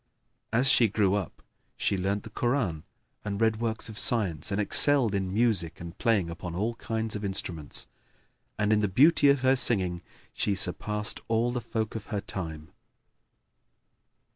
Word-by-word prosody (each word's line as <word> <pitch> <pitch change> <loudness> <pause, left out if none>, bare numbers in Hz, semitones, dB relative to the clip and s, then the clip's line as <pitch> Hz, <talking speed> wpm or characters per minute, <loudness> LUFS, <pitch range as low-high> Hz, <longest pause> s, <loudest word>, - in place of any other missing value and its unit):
As 125 +4 +6
she 120 - +5
grew 100 -2 +1
up 100 -4 -4 0.3
she - - 0
learnt 100 +2 -1
the 110 - -11
Koran 110 - -1 0.4
and 100 -1 -4
read 110 -1 +2
works 115 0 -2
of 110 0 -7
science 100 -9 0
and 100 - -1
excelled 125 +2 +4
in 95 -2 -1
music 105 -6 0
and 85 0 -8
playing 110 -7 +2
upon 85 0 -7
all 110 +6 -1
kinds 110 -1 -3
of 105 - -5
instruments; 85 -6 -4 0.7
and 105 +1 +2
in 105 - +3
the 105 - +1
beauty 145 - +5
of 140 -1 +3
her 130 +1 +4
singing 95 -9 +1 0.3
she 100 - 0
surpassed 105 +4 -1
all 115 +2 +1
the 125 0 -3
folk 110 -1 -3
of 110 - -7
her 105 -3 -2
time. 80 -6 -6
105 Hz, 165 wpm, -28 LUFS, 95-115 Hz, 0.7 s, As